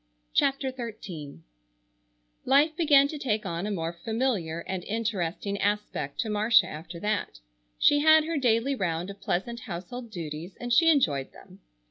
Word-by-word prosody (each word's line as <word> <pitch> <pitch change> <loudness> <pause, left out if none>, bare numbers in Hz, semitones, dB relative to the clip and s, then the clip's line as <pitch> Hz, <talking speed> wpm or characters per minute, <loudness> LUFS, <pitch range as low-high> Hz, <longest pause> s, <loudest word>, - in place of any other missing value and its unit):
CHAPTER 270 -1 +1
XIII 190 - -7 1.0
Life 290 +4 +4
began 290 -4 +5
to 300 - -6
take 220 -5 -1
on 170 +1 -3
a - - -2
more 165 -3 -2
familiar 195 -4 -2
and 185 0 -5
interesting 200 -3 -2
aspect 205 -8 -2
to 220 - -4
Marcia 215 +3 +4
after 165 +3 -8
that. 210 - -2 0.4
She 290 - +5
had 315 +1 +6
her 330 -1 -2
daily 245 0 +2
round 175 -5 -2
of 200 0 -14
pleasant 200 +6 -2
household 225 +5 -7
duties 165 -2 -7
and 245 0 -2
she 330 +6 +6
enjoyed 150 - +2
them. - - -16
210 Hz, 150 wpm, -27 LUFS, 170-260 Hz, 1.0 s, had